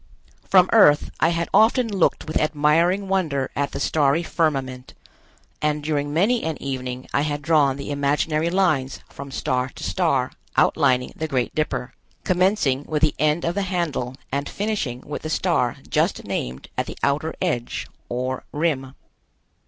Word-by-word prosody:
From 185 -1 +6
Earth 150 -10 +5
I 165 - +4
had 170 0 -1
often 235 +2 +4
looked 195 -5 +1
with 155 - -5
admiring 160 +6 +2
wonder 160 -9 0
at 140 0 0
the - - -5
starry 150 +2 +2
firmament, 135 -7 -2 0.7
and 150 0 0
during 145 -1 -1
many 205 +10 +2
an 160 -1 -3
evening 130 -2 -5
I 140 - +2
had 145 -1 -2
drawn 145 -3 +3
the 140 +1 -5
imaginary 150 +3 0
lines 170 -8 +1
from 140 0 -9
star 125 +1 -1
to - - -11
star 140 -9 +1 0.3
outlining 125 -1 +3
the 160 - -3
Great 130 -5 -1
Dipper, 145 -4 -2 0.3
commencing 180 -7 +2
with 155 0 -1
the 155 - +4
end 155 +2 +2
of 170 - 0
the 200 - -1
handle 170 -9 -2 0.2
and 140 +1 -2
finishing 195 - -2
with 150 - -6
the 155 - -5
star 155 -8 +1
just - - 0
named 65 +2 -4
at - - -1
the - - -7
outer 150 +3 0
edge, 120 -1 -2 0.2
or 130 +1 -3
rim. 140 -4 -1
150 Hz, 160 wpm, -23 LUFS, 135-170 Hz, 0.7 s, From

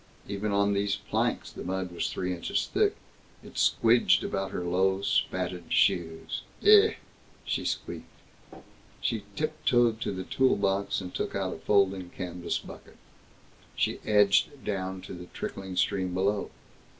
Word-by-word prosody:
Even 100 +1 -2
on 100 0 +2
these 100 0 +1
planks, 100 - -1
the - - -8
mud 95 0 -3
was 85 -2 -2
three 90 +3 -2
inches 85 - -1
thick. - - +3 0.5
It - - -12
squidged 115 -5 +4
about 95 0 -2
her 90 - -4
low, 95 +2 +1
spatted 90 -3 0
shoes. 85 -4 +1 0.2
"Eeh!" 425 +1 +7 0.5
she - - -1
squeaked. - - -4 0.9
She 110 -4 -2
tiptoed 120 -7 +1
to - - -1
the 95 -1 -4
tool 130 +7 +2
box 100 0 0
and 90 -1 -7
took - - -3
out 95 -2 -1
a - - -9
folding 95 0 +2
canvas 90 -1 -4
bucket. - - -12 0.8
She - - 0
edged 105 +6 +3
down 95 -2 -3
to 95 - -9
the 90 0 -9
trickling 95 -1 -5
stream 95 -1 0
below. 100 +2 0
95 Hz, 145 wpm, -28 LUFS, 90-100 Hz, 0.9 s, Eeh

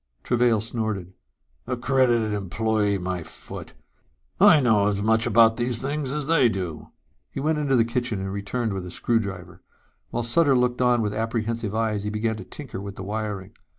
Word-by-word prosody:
_ - - -42
Travail 120 -2 +2
snorted. 110 -5 -3 0.5
"Accredited 125 -3 +2
employee, 105 +1 0
my 90 -1 -3
foot! 85 0 -9 0.6
I 155 - +8
know 110 -6 +3
as 100 -1 0
much 110 +1 +3
about 115 0 +5
these 120 -1 0
things 140 +1 -2
as 150 0 -2
they 150 -6 +4
do." 90 -7 -5 0.4
He - - -6
went 155 +2 0
into 140 -3 +1
the 115 -2 +4
kitchen 120 -3 -2
and 95 0 -4
returned 105 +2 -2
with 95 -1 -4
a 90 - -7
screwdriver. 100 -3 -2 0.5
While 120 - -2
Sutter 135 +4 +3
looked 125 0 +1
on 125 -2 +3
with 105 -1 -1
apprehensive 115 -1 -2
eyes, 110 -2 0
he 105 - -3
began 110 +1 -1
to - - -7
tinker 135 -9 -8
with 100 0 -7
the 95 - -7
wiring. 105 -1 -4
110 Hz, 180 wpm, -24 LUFS, 100-125 Hz, 0.6 s, I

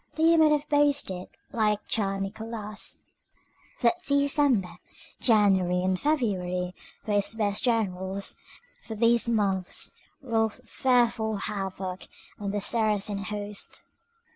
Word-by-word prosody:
Leo 325 +1 +5
might 310 -1 +6
have 295 -1 +1
boasted, 285 -11 +1 0.2
like 210 -2 +2
Czar 195 -3 0
Nicholas, 215 +1 -5 0.8
that 245 +9 +2
December, 280 - +2 0.4
January, 190 -6 +4
and 185 0 +1
February 185 -11 0 0.3
were 210 - -1
his 205 +2 +1
best 205 -2 -1
generals—for 200 - -3
these 235 +1 +3
months 195 -5 0 0.3
wrought 225 -5 0
fearful 235 -4 +2
havoc 195 -2 -4 0.3
in 200 -1 -3
the 205 +1 -1
Saracen 210 -2 0
host. 205 -1 -4
210 Hz, 105 wpm, -27 LUFS, 195-235 Hz, 0.8 s, might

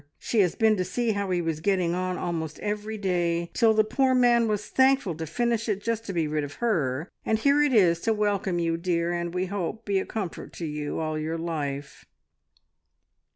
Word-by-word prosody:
She 230 - -1
has 180 -4 +3
been 220 -1 +4
to 185 - +1
see 235 +5 -1
how 200 -2 -2
he 175 -1 0
was 165 -2 -2
getting 180 -1 +1
on 185 0 -2
almost 160 -3 -3
every 210 +1 -3
day, 170 -3 0
till 225 -2 +4
the 215 - +5
poor 260 +4 +2
man 240 -2 +4
was 210 -1 -1
thankful 265 -8 +3
to 160 0 -6
finish 230 +6 -1
it, 200 -2 0
just 225 +1 -2
to - - -2
be 165 -3 0
rid 150 0 -1
of 145 0 -7
her, 160 - 0 0.2
and 220 - +1
here 280 +6 +3
it 295 -1 +3
is 180 -8 +4
to 225 - 0
welcome 205 -4 0
you, 165 -1 0
dear, 170 0 0
and, 170 0 -2
we 180 +1 -1
hope, 200 +3 -4
to 205 - -4
be 195 - +3
a - - -3
comfort 200 -6 -5
to 170 - -5
you, 150 -1 -4
all 155 -1 -2
your 160 +2 -2
life." 145 -4 -4
185 Hz, 215 wpm, -26 LUFS, 165-220 Hz, 0.2 s, the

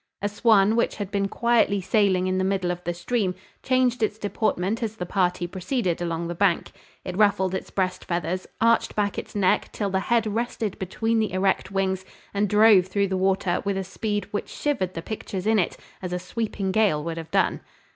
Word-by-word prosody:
A - - +2
swan, 210 0 +4
which 235 - +1
had 205 -2 -5
been 200 -1 0
quietly 230 -2 +2
sailing 190 -1 +2
in 185 0 0
the - - +1
middle 190 -2 0
of 175 0 -6
the 175 - 0
stream, 180 +2 -1 0.3
changed 255 -2 +2
its 215 -1 0
deportment 210 0 -1
as 220 -2 -2
the 180 - -4
party 180 -1 0
proceeded 185 0 -2
along 170 -1 -2
the 175 - -3
bank. 175 -1 +1 0.3
It 180 - -4
ruffled 190 -2 +3
its 190 - -4
breast 185 -1 -2
feathers, 175 +1 -2
arched 230 0 +3
back 205 -1 0
its - - -10
neck 195 -3 +2
till 200 -2 -2
the 190 - +1
head 230 +3 +1
rested 220 -1 -2
between 225 +5 0
the 215 -3 0
erect 190 +1 +1
wings, 190 -1 -1 0.3
and 200 0 +1
drove 210 -3 +6
through 200 +1 0
the 190 - -1
water 190 -1 +1
with 200 -1 -1
a 195 - -1
speed 205 +2 -3
which 205 - -3
shivered 250 -12 -2
the 165 - -5
pictures 195 -2 -5
in 220 0 +3
it 180 - -1 0.2
as 180 -1 -4
a - - 0
sweeping 195 +1 -3
gale 190 -8 +2
would 165 0 -4
have 165 -1 -7
done. - - +1
195 Hz, 205 wpm, -25 LUFS, 185-215 Hz, 0.3 s, drove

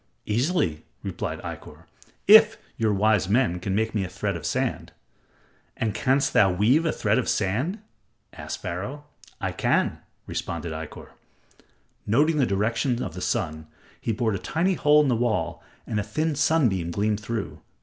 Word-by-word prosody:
"Easily," 115 - 0 0.2
replied - - -4
Ikkor, - - -8 0.4
"if - - +8 0.2
your 110 -1 +1
wise 100 -1 +2
men 110 -5 +2
can 95 +2 -2
make 110 +1 0
me 105 -3 0
a 90 - -5
thread 100 +1 -3
of 85 - -4
sand." - - -2 0.9
"And 110 -2 -1
canst 135 +4 +1
thou 95 -2 +5
weave 115 - +3
a - - +2
thread 110 +2 +1
of 130 - -2
sand?" 115 - 0 0.6
asked - - -7
Pharaoh. 125 +12 -5 0.4
"I - - -2
can," - - +1 0.3
responded 85 - -4
Ikkor. 80 0 -8 1.0
Noting 150 +9 +3
the 135 -4 +3
direction 115 +5 0
of - - -5
the 90 - -7
sun, 80 -4 -2 0.3
he - - -1
bored 110 0 0
a 95 - -2
tiny 165 - 0
hole 150 -3 +4
in - - +1
the 125 - +2
wall, 110 -8 -1 0.2
and 105 - -2
a - - -1
thin 155 +10 -1
sunbeam 125 - +2
gleamed 105 +4 0
through. 110 0 -4
110 Hz, 160 wpm, -25 LUFS, 95-135 Hz, 1.0 s, if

